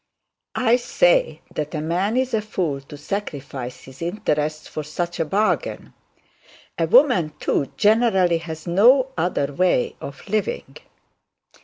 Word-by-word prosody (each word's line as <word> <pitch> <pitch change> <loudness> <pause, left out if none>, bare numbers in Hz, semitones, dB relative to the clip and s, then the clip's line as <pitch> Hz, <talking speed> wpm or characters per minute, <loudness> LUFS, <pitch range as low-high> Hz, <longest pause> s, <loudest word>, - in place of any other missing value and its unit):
I 245 -1 +3
say - - +2
that 150 +1 -4
a - - -1
man 180 +9 0
is 260 -1 0
a 220 - +2
fool 175 -9 -2
to 140 +2 -11
sacrifice 140 -8 -5
his 130 +2 -14
interests 155 -4 -2
for 155 - -5
such 170 +4 -4
a 165 - +1
bargain. 205 +7 -1 0.9
A - - +2
woman, 225 - +4
too 140 - 0
generally, 205 -6 +3
has 160 -2 -8
no 245 +10 +4
other 160 -4 -1
way 180 -5 +1
of 140 +7 -9
living.' 215 - -2
175 Hz, 135 wpm, -22 LUFS, 150-215 Hz, 0.9 s, woman